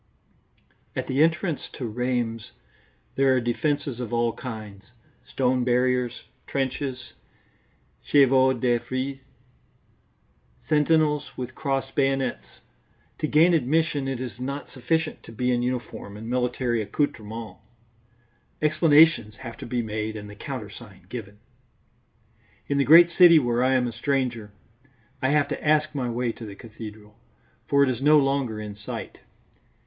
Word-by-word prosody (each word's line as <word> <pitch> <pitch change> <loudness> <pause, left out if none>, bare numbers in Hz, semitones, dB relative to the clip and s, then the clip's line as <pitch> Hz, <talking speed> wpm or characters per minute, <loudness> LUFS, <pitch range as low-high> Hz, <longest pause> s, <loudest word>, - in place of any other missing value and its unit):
At - - -2
the 135 +3 0
entrance 165 0 +1
to 130 - -5
Rheims 120 -1 -2 0.6
there 135 -1 +3
are - - +3
defences 125 +2 -1
of 120 -4 -5
all 120 -1 +1
kinds: 110 -5 -8 0.4
stone 125 -1 +1
barriers, 125 0 +1 0.2
trenches, 130 -1 -3 0.9
chevaux 130 -2 +4
de 120 0 +2
frise, 130 +3 -4 1.5
sentinels 150 0 +2
with 130 0 -5
crossed 135 -2 -2
bayonets. 135 -1 -1 0.6
To 155 - 0
gain 160 +4 +5
admission 155 -1 +1
it 135 -2 -3
is 125 -3 -6
not 140 +3 -5
sufficient 155 +5 -1
to - - -13
be 125 +3 -1
in 120 -1 +1
uniform 120 -4 -4
and 110 +2 -8
military 125 -1 0
accoutrements; 110 -1 -3 1.0
explanations 155 -6 +4
have 115 +1 -9
to - - -8
be 120 -1 -1
made 110 0 -4
and 105 -1 -7
the 105 - -11
countersign 105 - -8
given. 105 -4 -7 1.3
In 140 0 0
the 140 - +3
great 170 +3 +8
city 170 -1 +7
where 120 -3 +2
I 130 +1 +3
am 125 -1 +2
a 120 - -2
stranger, 120 -3 -2 0.7
I 130 - +1
have 145 -1 +3
to - - -4
ask 155 0 +2
my 130 -4 -2
way 120 0 -1
to 115 - -10
the 100 - -9
cathedral, 105 0 -11 0.5
for 140 0 +4
it 135 - +2
is 125 0 -5
no 150 +2 +6
longer 135 -6 0
in 105 -1 -7
sight. 105 0 -7
125 Hz, 140 wpm, -25 LUFS, 115-140 Hz, 1.5 s, great